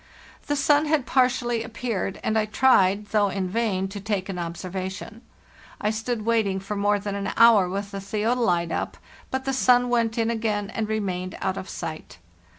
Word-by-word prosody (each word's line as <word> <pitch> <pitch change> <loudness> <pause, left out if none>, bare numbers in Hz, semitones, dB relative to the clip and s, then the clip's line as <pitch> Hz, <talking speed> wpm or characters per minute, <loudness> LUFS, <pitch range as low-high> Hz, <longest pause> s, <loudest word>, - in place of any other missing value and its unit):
The 290 - +1
sun 290 +2 +3
had 300 -4 +1
partially 245 -3 +2
appeared, 225 -4 -3
and 220 - 0
I 220 -1 +2
tried, 210 -3 +3
though 205 -2 +2
in 190 -1 -2
vain, 195 -2 0
to 205 +1 -6
take 200 -2 -2
an 185 -2 -4
observation. 185 +5 -5 0.6
I 210 - 0
stood 220 0 -3
waiting 220 -4 +1
for 195 +2 -5
more 205 +1 +2
than 205 0 -4
an 200 0 -2
hour 220 -5 +6
with 200 +2 -4
the 195 - -5
theodolite 210 -4 0
up, - - -3 0.3
but 265 0 -3
the 270 - 0
sun 245 -1 +4
went 230 -2 +1
in 230 0 +1
again 215 -2 -1
and 220 -1 -3
remained 185 -4 -2
out 190 - -1
of 190 - -6
sight. 155 - -7
210 Hz, 180 wpm, -25 LUFS, 195-230 Hz, 0.6 s, hour